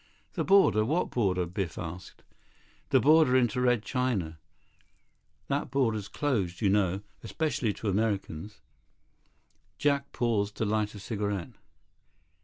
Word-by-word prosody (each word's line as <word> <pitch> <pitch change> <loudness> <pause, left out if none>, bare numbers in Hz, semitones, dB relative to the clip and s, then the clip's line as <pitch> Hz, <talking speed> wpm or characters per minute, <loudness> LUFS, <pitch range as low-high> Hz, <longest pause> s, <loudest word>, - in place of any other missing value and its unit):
"The - - -1
border? 195 - +5
What 155 +10 0
border?" 95 -6 +1
Biff 85 -2 -4
asked. 90 +1 -8 0.7
"The - - +5
border 150 -3 +5
into 125 0 +1
Red 125 -3 +2
China. 105 - -2 1.1
That - - -1
border's 115 -7 0
closed, 100 -9 -1
you 105 - +2
know, 95 -1 +1 0.2
especially 130 -2 -1
to 110 - -6
Americans." 100 -2 -2 1.2
Jack 140 +3 0
paused 105 -4 0
to 110 - 0
light 105 0 -1
a - - -8
cigarette. 100 -3 -3
110 Hz, 120 wpm, -29 LUFS, 95-125 Hz, 1.2 s, border